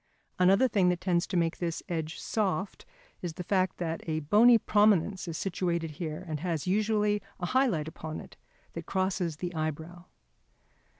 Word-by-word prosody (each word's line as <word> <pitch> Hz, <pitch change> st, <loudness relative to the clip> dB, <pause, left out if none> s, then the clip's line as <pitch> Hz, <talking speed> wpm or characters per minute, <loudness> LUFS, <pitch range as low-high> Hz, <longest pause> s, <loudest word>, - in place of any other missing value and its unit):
Another 195 Hz, +7 st, +5 dB
thing 195 Hz, -6 st, +3 dB
that 175 Hz, -1 st, 0 dB
tends 175 Hz, -1 st, +1 dB
to 185 Hz, -, -1 dB
make 165 Hz, -1 st, +1 dB
this 170 Hz, -2 st, -3 dB
edge 160 Hz, -3 st, -3 dB
soft 200 Hz, -2 st, -2 dB, 0.3 s
is 175 Hz, -3 st, -4 dB
the 180 Hz, -, -6 dB
fact 185 Hz, 0 st, +1 dB
that 165 Hz, -2 st, -3 dB
a 155 Hz, 0 st, -1 dB
bony 225 Hz, +10 st, +6 dB
prominence 205 Hz, -4 st, +2 dB
is 165 Hz, -1 st, -4 dB
situated 170 Hz, -3 st, -2 dB
here 155 Hz, +2 st, -5 dB
and 155 Hz, -2 st, -3 dB
has 165 Hz, -2 st, -2 dB
usually 210 Hz, +1 st, +1 dB, 0.2 s
a 175 Hz, -, -2 dB
high 260 Hz, +8 st, +3 dB
light 160 Hz, -9 st, -1 dB
upon 160 Hz, 0 st, -6 dB
it -, -, -12 dB, 0.4 s
that 165 Hz, -1 st, -7 dB
crosses 185 Hz, -3 st, -1 dB
the 175 Hz, +3 st, -5 dB
eyebrow. 160 Hz, +2 st, -4 dB
180 Hz, 170 wpm, -29 LUFS, 165-195 Hz, 0.4 s, bony